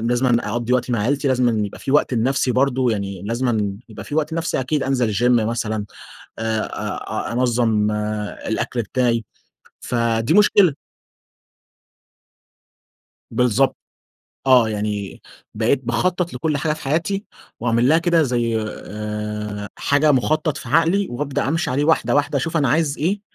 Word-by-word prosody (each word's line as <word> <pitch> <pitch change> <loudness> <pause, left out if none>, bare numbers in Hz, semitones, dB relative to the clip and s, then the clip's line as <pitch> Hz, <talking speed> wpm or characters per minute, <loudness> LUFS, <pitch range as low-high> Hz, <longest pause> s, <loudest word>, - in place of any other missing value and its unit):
لازمًا 120 +1 +1
أقضي 120 +1 -1
وقت 125 0 +1
مع 115 - +1
عيلتي، 140 +5 0
لازمًا 120 -5 +2
يبقى - - -10
في - - -4
وقت 145 -3 +3
لنفسي 125 +2 +1
برضه، 130 -1 +2
يعني 100 -3 -4
لازمًا 110 -3 -1
يبقى 110 - -9
في 145 - -6
وقت 155 0 0
لنفسي 165 -4 -1
أكيد، 140 +3 -1
أنزل 125 -6 0
الgym 120 +4 +2 0.2
مثلًا، 110 -2 -2 0.5
آآ، 110 -1 0
آآ، - - -4
أنظم 115 -4 +1
الأكل 105 +2 -3
بتاعي، 115 0 0 0.6
فدي 115 -1 0
مشكلة. 205 -5 +5 2.6
بالضبط. 125 +2 +2 0.7
آه، 125 -4 +6
يعني 105 -2 -4 0.3
بقيت 115 +5 +1
باخطط 175 +7 0
لكل 150 +3 -1
حاجة 155 +2 0
في 155 - -7
حياتي، 170 +8 -1 0.4
واعمل 120 +1 +2
لها 160 +3 +5
كده 170 -1 +3
زي 120 -4 0
آآ، 105 -1 -5
حاجة 145 +1 +3
مخطط 155 +3 +1
في 115 - -8
عقلي 165 +7 +3
وأبدأ 135 +2 -2
أمشي 165 -2 0
عليه 140 +3 +1
واحدة 160 -2 +2
واحدة، 145 0 +1
أشوف 165 +4 -2
أنا 140 -5 +2
عايز 150 +1 +1
إيه، 195 +6 0
125 Hz, 140 wpm, -21 LUFS, 110-145 Hz, 2.6 s, آه